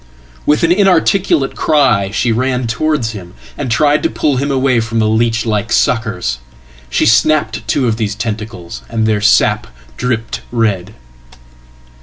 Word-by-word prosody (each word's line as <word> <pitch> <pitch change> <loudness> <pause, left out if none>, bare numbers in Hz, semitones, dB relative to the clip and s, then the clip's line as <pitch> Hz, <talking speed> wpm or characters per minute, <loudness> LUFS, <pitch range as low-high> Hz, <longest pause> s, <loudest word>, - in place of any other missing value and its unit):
With 150 +2 +2
an 165 - +3
inarticulate 185 -5 +2
cry 130 -11 +2
she 115 +3 0
ran 125 +2 0
towards 115 +1 -1
him, 95 -4 -10 0.2
and 140 -3 -4
tried 145 +5 +2
to - - 0
pull 145 -4 0
him 140 +3 -1
awayfrom 125 -4 0
the 110 -1 +2
leech 115 +1 +1
like 105 -1 -1
suckers. 105 - 0 0.5
She 65 - +1
snapped 110 0 +2
two 130 - +1
of 110 -1 0
these 105 -2 -2
tentacles, 105 -6 -6
and 110 -1 -1
theirsap 105 -1 +2 0.3
dripped 120 -2 -2
red. 105 -4 -1
115 Hz, 140 wpm, -15 LUFS, 110-135 Hz, 0.5 s, an